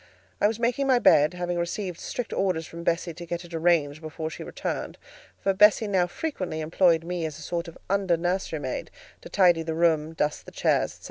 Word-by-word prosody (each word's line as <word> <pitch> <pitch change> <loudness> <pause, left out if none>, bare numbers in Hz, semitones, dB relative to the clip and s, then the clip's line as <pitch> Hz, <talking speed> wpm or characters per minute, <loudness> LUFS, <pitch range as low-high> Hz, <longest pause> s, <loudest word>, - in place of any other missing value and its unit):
I - - +6
was 220 +1 -2
making 245 +4 +1
my 260 -2 +5
bed, 155 -7 +5
having 175 -1 -2
received 175 0 -3
strict 245 -2 -4
orders 180 -4 0
from 170 +1 -9
Bessie 170 0 0
to 175 - -9
get 170 +1 -5
it 170 - -13
arranged 160 -3 +2
before 155 0 -5
she - - -7
returned - - -4 0.4
(for 195 - +1
Bessie 210 +2 +5
now 185 -3 +2
frequently 185 - -4
employed 165 +1 +3
me 175 0 -3
as 155 -2 -4
a 155 - -10
sort 170 +2 -3
of 165 - -10
under 195 -3 +1
nurserymaid, 170 -6 -2 0.3
to - - -10
tidy 175 -4 +4
the 160 0 -3
room, 160 -2 +2
dust 150 -2 -1
the - - -9
chairs, - - +1
&c.). - - -20
170 Hz, 205 wpm, -26 LUFS, 160-190 Hz, 0.4 s, I